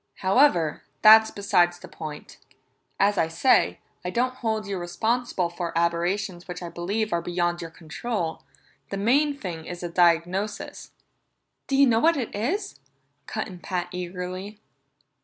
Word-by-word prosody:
However, 190 - +3 0.2
that's 220 +1 +9
beside 175 -3 +2
the 175 - -12
point; 155 -2 -9 0.6
as 205 +1 +3
I 160 - +3
say, 165 +11 +3 0.3
I 180 - -2
don't 250 +6 0
hold 220 -4 -2
you 200 -2 -3
responsible 220 +2 -1
for 170 -1 -4
aberrations 175 +2 -1
which 180 0 -6
I 170 - -5
believe 200 +6 -2
are 170 - +1
beyond 175 0 -1
your 165 - -6
control. 165 +2 -4 0.5
The 195 - -3
main 280 +8 +2
thing 170 -9 -6
is 175 0 -7
a 175 - -3
diagnosis." 175 +4 +1 0.8
"Do 275 - 0
you 280 +1 +6
know 230 -3 +3
what 330 +4 +4
it 245 -5 -3
is?" 365 - -2 0.5
cut 215 - -3
in 185 -4 -10
Pat 175 -1 -3
eagerly. 180 +3 -6
185 Hz, 150 wpm, -25 LUFS, 175-220 Hz, 0.8 s, that's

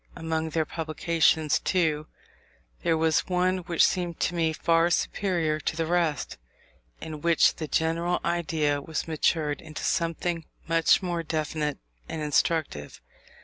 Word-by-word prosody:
Among 160 0 -2
their 160 0 0
publications, 160 -1 +1
too, 155 -4 0 0.7
there 165 -1 +2
was 160 0 +2
one 185 0 +1
which 170 -1 +3
seemed 175 -3 -1
to - - +1
me 165 -2 +1
far 165 +1 +2
superior 170 -3 0
to 155 - -2
the 165 0 -1
rest; 165 - -1 0.6
in 155 -2 -7
which 170 0 +4
the 155 - -4
general 165 +3 0
idea 155 -4 0
was 160 +3 -4
matured 155 -1 0
into 155 -1 -8
something 165 -1 -1 0.2
much 165 +2 +3
more 175 -2 -1
definite 155 -2 -2 0.3
and 160 - -4
instructive. 150 - 0
160 Hz, 135 wpm, -27 LUFS, 155-170 Hz, 0.7 s, which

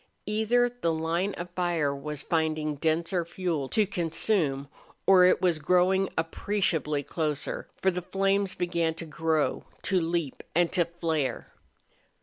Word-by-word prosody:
Either 220 +4 +2
the 240 -9 -2
line 165 +4 -1
of 175 0 -7
fire 170 -6 0
was 150 +1 -6
finding 155 -2 0
denser 165 +4 0
fuel 165 -5 -3
to 215 - +2
consume 165 -5 0 0.4
or 185 -2 +7
it 185 - +4
was 175 -4 +3
growing 180 +4 +3
appreciably 165 -3 0
closer, 150 -1 -3 0.2
for 190 - +4
the 180 0 -3
flames 195 +1 0
began 170 -2 0
to 165 - -6
grow, 160 0 0 0.2
to 185 -2 +2
leap, 165 -3 -2
and 175 0 +3
to 175 -3 +2
flare. 165 -4 -2
170 Hz, 135 wpm, -28 LUFS, 160-185 Hz, 0.4 s, or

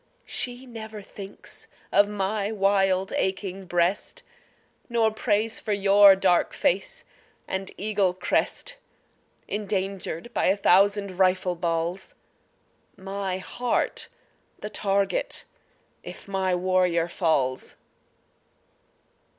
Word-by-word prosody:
She 245 +1 -3
never 220 -3 -8
thinks 195 0 -9 0.2
of 205 0 +5
my 205 +1 -1
wild 195 -2 +2
aching 190 0 -2
breast, 180 - 0 0.7
Nor 230 -2 +2
prays 220 0 0
for 215 - -2
your 200 0 +7
dark 185 -2 +2
face 200 - 0 0.4
and 190 0 -3
eagle 200 -3 +1
crest - - -1 0.7
Endangered 195 0 -3
by - - +1
a 195 - +3
thousand 200 0 +3
rifle 185 -1 +3
balls, 170 +1 -2 0.8
My 195 -1 -3
heart 240 +6 -1 0.5
the 210 - -7
target 195 -1 0 0.6
if - - -10
my 190 -2 0
warrior 180 -2 +2
falls. 145 -7 0
195 Hz, 95 wpm, -26 LUFS, 185-210 Hz, 0.8 s, your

